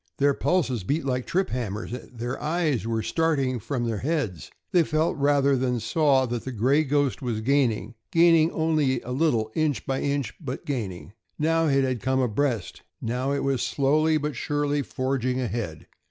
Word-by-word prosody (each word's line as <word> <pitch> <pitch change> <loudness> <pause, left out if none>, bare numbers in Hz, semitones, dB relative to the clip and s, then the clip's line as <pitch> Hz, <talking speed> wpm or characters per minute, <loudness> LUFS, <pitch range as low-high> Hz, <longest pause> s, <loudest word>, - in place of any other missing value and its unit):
Their 140 0 +3
pulses 135 - 0
beat 145 - -1
like 125 -2 -1
trip 190 +2 0
hammers; 110 -4 -3
their 125 0 -6
eyes 150 -7 0
were 110 -1 -1
starting 140 -4 0
from 120 +2 -2
their 115 -3 -2
heads. 140 - -2 0.2
They 180 -3 +5
felt 155 +1 +1
rather 140 -1 +3
than 125 -1 0
saw 135 +3 +2
that 120 -1 -3
the 130 - -5
"Gray 130 +7 +2
Ghost" 145 -2 0
was 120 -4 -2
gaining 125 -3 +1 0.2
gaining 165 -1 +5
only 155 -7 +1
a 125 - -7
little, 125 -6 +1
inch 155 -3 0
by 135 0 -1
inch, 140 -2 -1
but 130 -2 -5
gaining. 100 -9 -4 0.2
Now 165 +1 +2
it 135 -2 +3
had 130 -4 -1
come 130 +1 +1
abreast; 125 - -1 0.2
now 125 +4 -2
it 140 - -1
was 135 -2 0
slowly 155 +3 +2
but 150 -2 -3
surely 145 +2 0
forging 130 -1 -1
ahead. 115 -10 -4
135 Hz, 170 wpm, -25 LUFS, 120-150 Hz, 0.2 s, They